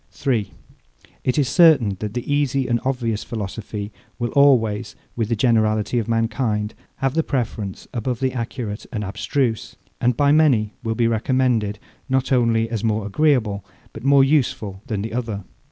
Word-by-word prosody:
3. 110 Hz, -8 st, -1 dB, 0.7 s
It 130 Hz, -, 0 dB
is 145 Hz, -3 st, +3 dB
certain 140 Hz, -, +5 dB
that 105 Hz, +1 st, -5 dB
the 125 Hz, +3 st, -2 dB
easy 135 Hz, -2 st, +1 dB
and 120 Hz, -1 st, +1 dB
obvious 120 Hz, -5 st, -1 dB
philosophy 105 Hz, -1 st, -5 dB, 0.3 s
will 120 Hz, -2 st, -2 dB
always, 120 Hz, -6 st, +3 dB, 0.2 s
with 115 Hz, -2 st, -1 dB
the 115 Hz, -, +1 dB
generality 110 Hz, 0 st, +2 dB
of 115 Hz, -, -3 dB
mankind, 115 Hz, -2 st, 0 dB, 0.2 s
have 135 Hz, -1 st, -1 dB
the 160 Hz, -, +2 dB
preference 115 Hz, -, -3 dB
above 120 Hz, 0 st, -2 dB
the 130 Hz, -1 st, 0 dB
accurate 115 Hz, -3 st, -5 dB
and 110 Hz, -4 st, -3 dB
abstruse; 110 Hz, +4 st, -2 dB, 0.3 s
and 120 Hz, -1 st, +2 dB
by 145 Hz, 0 st, +4 dB
many 135 Hz, -9 st, +3 dB
will 115 Hz, 0 st, -1 dB
be 120 Hz, -, +2 dB
recommended, 115 Hz, -2 st, +1 dB, 0.3 s
not 130 Hz, 0 st, 0 dB
only 115 Hz, -3 st, +3 dB
as 115 Hz, -2 st, -3 dB
more 110 Hz, -2 st, 0 dB
agreeable, 110 Hz, -4 st, +1 dB, 0.3 s
but 110 Hz, -, -9 dB
more 140 Hz, 0 st, +6 dB
useful 120 Hz, -9 st, 0 dB
than 105 Hz, -3 st, -2 dB
the 110 Hz, -, -5 dB
other. 115 Hz, -5 st, -3 dB
115 Hz, 160 wpm, -22 LUFS, 105-130 Hz, 0.7 s, more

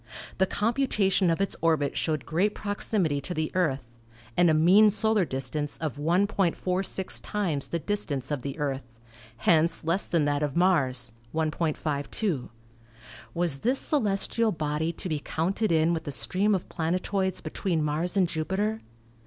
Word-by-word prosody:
The 190 Hz, -, +4 dB
computa 220 Hz, -2 st, +1 dB
tion 185 Hz, -1 st, +3 dB
of 165 Hz, -, +1 dB
its 195 Hz, -, +1 dB
orbit 160 Hz, -4 st, +1 dB
showed 155 Hz, -5 st, -1 dB
great 185 Hz, +6 st, 0 dB
proximity 205 Hz, -7 st, -1 dB
to 175 Hz, +6 st, -5 dB
the 155 Hz, 0 st, -1 dB
Earth, 150 Hz, -9 st, 0 dB, 0.5 s
and 175 Hz, -1 st, +4 dB
a -, -, +4 dB
mean 185 Hz, +7 st, +6 dB
solar 215 Hz, -1 st, +3 dB
distance 135 Hz, +2 st, -3 dB
of 155 Hz, -4 st, -4 dB
1.46 185 Hz, +2 st, 0 dB
times 175 Hz, -10 st, -2 dB
the 170 Hz, -, -2 dB
distance 155 Hz, -8 st, -3 dB
of 145 Hz, -3 st, -1 dB
the 140 Hz, +3 st, -5 dB
Earth; 140 Hz, -3 st, -2 dB, 0.5 s
hence 165 Hz, 0 st, +2 dB
less 170 Hz, +5 st, 0 dB
than 165 Hz, -4 st, +1 dB
that 145 Hz, 0 st, 0 dB
of 145 Hz, -2 st, -2 dB
Mars 135 Hz, -, +2 dB, 0.2 s
(1.52). 155 Hz, -, -1 dB, 0.9 s
Was 170 Hz, -5 st, +1 dB
this 255 Hz, -, +1 dB
celestial 225 Hz, -3 st, +1 dB
body 155 Hz, 0 st, -1 dB
to 170 Hz, -, -4 dB
be 155 Hz, -4 st, -1 dB
counted 180 Hz, +8 st, -1 dB
in 160 Hz, +1 st, +3 dB
with 165 Hz, -1 st, -3 dB
the 145 Hz, -, -4 dB
stream 180 Hz, -, +2 dB
of 185 Hz, -, -4 dB
planet 170 Hz, +2 st, -2 dB
oids 190 Hz, -2 st, -1 dB
between 170 Hz, -6 st, -1 dB
Mars 160 Hz, +6 st, 0 dB
and 185 Hz, -2 st, +4 dB
Jupiter? 190 Hz, +7 st, -2 dB
170 Hz, 155 wpm, -27 LUFS, 150-195 Hz, 0.9 s, mean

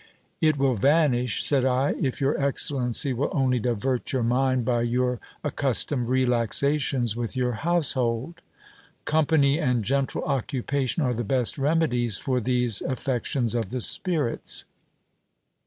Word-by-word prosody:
It 155 Hz, -2 st, +3 dB
will 135 Hz, -1 st, +2 dB
vanish, 125 Hz, -1 st, +2 dB
said 140 Hz, -3 st, +3 dB
I, 130 Hz, +2 st, +1 dB
if 130 Hz, -3 st, -1 dB
your 140 Hz, +1 st, +1 dB
excellency 135 Hz, -2 st, +1 dB
will 125 Hz, +4 st, -1 dB
only 130 Hz, -3 st, +1 dB
divert 120 Hz, +2 st, -2 dB
your 130 Hz, -3 st, 0 dB
mind 130 Hz, +1 st, +1 dB
by 120 Hz, -1 st, +1 dB
your 125 Hz, +1 st, 0 dB, 0.3 s
accus 140 Hz, -4 st, 0 dB
tomed 125 Hz, -5 st, -3 dB
relaxations 125 Hz, 0 st, +1 dB
with 120 Hz, +2 st, -4 dB
your 125 Hz, -1 st, 0 dB
household. 135 Hz, 0 st, -1 dB, 0.6 s
Company 150 Hz, -1 st, +2 dB
and 125 Hz, -8 st, 0 dB
gentle 135 Hz, +2 st, -1 dB
occupation 135 Hz, +2 st, -1 dB
are 125 Hz, -2 st, 0 dB
the 120 Hz, +1 st, -3 dB
best 125 Hz, +4 st, 0 dB
remedies 135 Hz, -8 st, +1 dB
for 130 Hz, -2 st, -1 dB
these 125 Hz, -2 st, 0 dB
affections 125 Hz, -2 st, -1 dB
of 115 Hz, -5 st, -2 dB
the 125 Hz, -, -3 dB
spirits. 155 Hz, -, 0 dB
130 Hz, 135 wpm, -25 LUFS, 120-140 Hz, 0.6 s, It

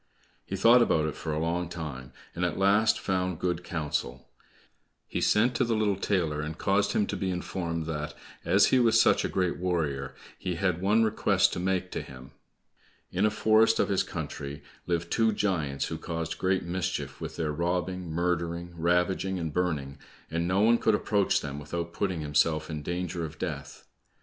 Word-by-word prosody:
He 95 Hz, -, -3 dB
thought 115 Hz, +6 st, +6 dB
about 80 Hz, -9 st, +3 dB
it 75 Hz, -, -2 dB
for 80 Hz, -, -4 dB
a 75 Hz, -, -1 dB
long 85 Hz, +2 st, -1 dB
time, 75 Hz, -7 st, -6 dB, 0.2 s
and 90 Hz, -, -3 dB
at 90 Hz, -2 st, 0 dB
last 100 Hz, +3 st, +3 dB
found 90 Hz, -2 st, -1 dB
good 90 Hz, 0 st, -1 dB
counsel. 75 Hz, -6 st, -3 dB, 0.8 s
He -, -, -3 dB
sent 120 Hz, +4 st, +3 dB
to 120 Hz, -, +1 dB
the 115 Hz, -2 st, +1 dB
little 105 Hz, -2 st, +2 dB
tailor 85 Hz, -6 st, 0 dB
and 75 Hz, +1 st, -5 dB
caused 100 Hz, 0 st, +1 dB
him 105 Hz, -, +2 dB
to -, -, -4 dB
be 95 Hz, -, -2 dB
informed 85 Hz, -2 st, -3 dB
that 75 Hz, -2 st, -4 dB, 0.3 s
as -, -, +4 dB
he 130 Hz, -, +6 dB
was 115 Hz, -2 st, +4 dB
such -, -, +4 dB
a -, -, -1 dB
great 90 Hz, -2 st, 0 dB
warrior, 75 Hz, -7 st, -1 dB, 0.2 s
he 90 Hz, -2 st, -2 dB
had 90 Hz, -1 st, 0 dB
one 105 Hz, +4 st, +4 dB
request 110 Hz, -1 st, +2 dB
to -, -, -3 dB
make 90 Hz, 0 st, -1 dB
to -, -, -3 dB
him. 65 Hz, 0 st, -12 dB, 0.8 s
In 95 Hz, +4 st, +2 dB
a -, -, +3 dB
forest 110 Hz, +1 st, +4 dB
of -, -, +2 dB
his 95 Hz, -2 st, +2 dB
country 75 Hz, -2 st, -6 dB, 0.2 s
lived 85 Hz, -1 st, -1 dB
two 115 Hz, -1 st, +3 dB
giants 80 Hz, -10 st, -1 dB
who -, -, -4 dB
caused 80 Hz, -1 st, -4 dB
great 95 Hz, 0 st, +1 dB
mischief 85 Hz, -6 st, -3 dB
with -, -, -5 dB
their 80 Hz, -2 st, -1 dB
robbing, 90 Hz, +2 st, -2 dB
murdering, 85 Hz, +1 st, -1 dB
ravaging, 90 Hz, +3 st, +1 dB
and 80 Hz, -4 st, -3 dB
burning, 75 Hz, -6 st, -1 dB, 0.3 s
and 85 Hz, +1 st, -1 dB
no 95 Hz, +2 st, +2 dB
one 115 Hz, +2 st, +5 dB
could 110 Hz, -, +3 dB
approach 105 Hz, -1 st, +1 dB
them 70 Hz, -1 st, -5 dB
without 85 Hz, +3 st, -5 dB
putting 95 Hz, -4 st, -1 dB
himself 75 Hz, +2 st, +1 dB
in 75 Hz, -1 st, -4 dB
danger 85 Hz, +1 st, -3 dB
of 80 Hz, -1 st, -6 dB
death. -, -, -6 dB
90 Hz, 185 wpm, -28 LUFS, 80-95 Hz, 0.8 s, thought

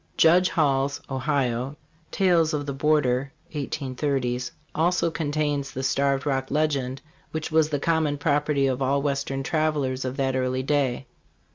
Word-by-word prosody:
Judge 180 Hz, +3 st, +5 dB
Hall's 140 Hz, -3 st, +1 dB
(Ohio) 130 Hz, -1 st, -1 dB, 0.2 s
' 160 Hz, 0 st, -35 dB
'Tales 170 Hz, -5 st, +3 dB
of 145 Hz, -1 st, -3 dB
the 140 Hz, -, -3 dB
Border" 135 Hz, -2 st, +1 dB
( -, -, -34 dB
183 135 Hz, -3 st, -2 dB, 0.2 s
), 155 Hz, -, -36 dB
also 170 Hz, 0 st, +2 dB
contains 145 Hz, -2 st, -1 dB
the 130 Hz, 0 st, -5 dB
Starved 140 Hz, +1 st, +1 dB
Rock 135 Hz, -2 st, -1 dB
legend, 140 Hz, -3 st, -1 dB, 0.3 s
which 160 Hz, 0 st, -4 dB
was 155 Hz, -1 st, +3 dB
the 145 Hz, -2 st, -1 dB
common 160 Hz, -1 st, +1 dB
property 145 Hz, -1 st, +1 dB
of 130 Hz, 0 st, 0 dB
all 140 Hz, +1 st, +1 dB
western 140 Hz, -1 st, -1 dB
travelers 145 Hz, -4 st, 0 dB
of 130 Hz, +1 st, -4 dB
that 135 Hz, -1 st, 0 dB
early 130 Hz, 0 st, 0 dB
day. 135 Hz, -2 st, 0 dB
140 Hz, 155 wpm, -25 LUFS, 135-155 Hz, 0.3 s, Judge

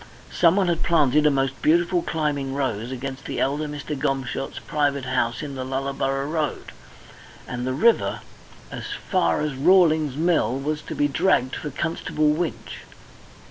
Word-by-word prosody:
Someone 185 Hz, +3 st, +3 dB
had 170 Hz, -2 st, 0 dB
planted 150 Hz, -3 st, +3 dB
a -, -, +6 dB
most 135 Hz, -1 st, -1 dB
beautiful 175 Hz, +3 st, +3 dB
climbing 145 Hz, -5 st, -2 dB
rose 120 Hz, -5 st, -2 dB
against 130 Hz, +1 st, -6 dB
the -, -, -4 dB
elder 145 Hz, +3 st, 0 dB
Mr. 150 Hz, 0 st, -5 dB
Gomshott's 135 Hz, 0 st, -2 dB
private 145 Hz, -3 st, -1 dB
house 120 Hz, -2 st, -1 dB
in 145 Hz, -2 st, -5 dB
the 130 Hz, -1 st, -4 dB
Lullaborough 135 Hz, +1 st, -2 dB
Road, 155 Hz, -2 st, -3 dB, 0.8 s
and 125 Hz, 0 st, -4 dB
the 130 Hz, -, 0 dB
river 230 Hz, -, +2 dB, 0.5 s
as -, -, -6 dB, 0.3 s
far 185 Hz, -5 st, +2 dB
as 150 Hz, -2 st, -1 dB
Rawling's 155 Hz, -1 st, +4 dB
Mill 160 Hz, -5 st, +1 dB
was 150 Hz, +2 st, -2 dB
to -, -, -7 dB
be 145 Hz, -, +2 dB
dragged 145 Hz, -4 st, +1 dB
for 150 Hz, -, -5 dB
Constable 155 Hz, +1 st, -1 dB
Winch. 160 Hz, +2 st, -3 dB
145 Hz, 150 wpm, -24 LUFS, 135-160 Hz, 0.8 s, a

